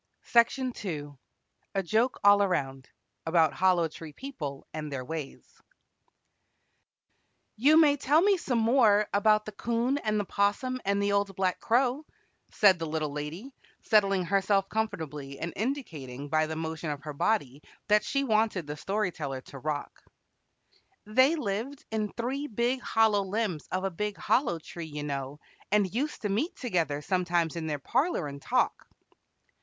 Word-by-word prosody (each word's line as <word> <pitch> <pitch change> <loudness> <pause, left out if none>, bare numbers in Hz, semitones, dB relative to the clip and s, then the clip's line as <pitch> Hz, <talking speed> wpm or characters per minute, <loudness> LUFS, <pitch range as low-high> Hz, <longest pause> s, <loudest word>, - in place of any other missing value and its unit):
She 235 - +4
was 235 - +5
sound 260 -2 -3
asleep. 160 -8 -4 0.7
A 195 - +1
JOKE 225 +8 +1
ALL 205 0 +7
AROUND 135 -9 -1 0.4
ABOUT 160 -3 +3
HOLLOW 175 +2 +3
TREE 155 0 -10
PEOPLE 150 - -7
AND 155 -1 -5
THEIR 130 -2 -4
WAYS 155 -1 -7 1.9
"You 295 +8 +5
may 290 -3 +5
tell 290 +3 +3
me 405 0 +5
some 260 -8 -1
more 220 -3 +4
about 215 +1 +3
the 215 - -6
'Coon 235 +6 -1
and 215 -4 0
the 205 - -1
'Possum 230 +7 0
and 200 +1 +1
the 200 - +1
Old 200 -1 0
Black 185 -1 0
Crow," 250 +4 +1 0.5
said 190 -4 +4
the 165 - -3
Little 155 -1 -2
Lady, 155 - -6 0.3
settling 195 -4 +3
herself 195 +1 +2
comfortably 155 -11 -4
and 170 +3 -4
indicating 155 - -4
by 155 +1 +2
the 160 - -4
motion 160 0 -4
of 145 -1 -5
her 150 - -6
body 145 - 0 0.3
that 210 +1 +4
she 275 -1 0
wanted 215 - +1
the 150 +1 -6
Story 200 +1 -1
Teller 135 -5 -5
to 135 - -11
rock. 150 +1 -4 1.0
"They 260 +9 +4
lived 245 +1 -4
in 215 -2 -1
three 265 +5 -2
big 240 +2 0
hollow 220 -4 +3
limbs 195 -4 -2
of 185 +1 -1
a 195 - -1
big 210 +4 -3
hollow 240 - +1
tree, 165 +1 -8
you 150 -1 -6
know, 140 0 -4 0.3
and 205 -3 +2
used 280 +4 -2
to 210 - 0
meet 235 - -1
together 165 - -1
sometimes 175 -3 0
in 165 -1 -4
their 150 -1 -1
parlor 250 - 0
and 140 0 -8
talk." - - 0
195 Hz, 160 wpm, -28 LUFS, 155-230 Hz, 1.9 s, ALL